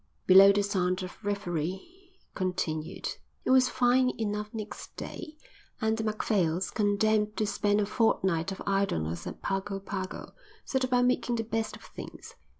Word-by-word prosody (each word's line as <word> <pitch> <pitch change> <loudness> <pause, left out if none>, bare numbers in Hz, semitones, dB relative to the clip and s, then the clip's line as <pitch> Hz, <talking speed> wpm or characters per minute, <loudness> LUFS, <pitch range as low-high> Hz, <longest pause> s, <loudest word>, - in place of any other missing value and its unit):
Below 195 +1 +9
the 205 0 +2
sound 185 -2 0
of 185 +4 -9
revelry 200 - -4 0.2
continued. 165 -4 -2 0.4
It - - +2
was 260 -1 +6
fine 255 +1 +3
enough 210 -1 -2
next 215 -2 -7
day, 310 -1 -7 0.4
and 220 0 +1
the 220 - -3
Macphails, 195 -5 0
condemned 210 0 +2
to 215 - +1
spend 205 0 +1
a 205 - +2
fortnight 190 -6 +1
of 190 - -6
idleness 85 - -1
at - - -8
Pago 195 0 -2
Pago, 190 -1 -5 0.3
set 265 -1 0
about 250 -1 +3
making 250 -1 +1
the 225 - -1
best 225 0 -2
of - - -15
things. - - -10
205 Hz, 150 wpm, -29 LUFS, 190-225 Hz, 0.4 s, Below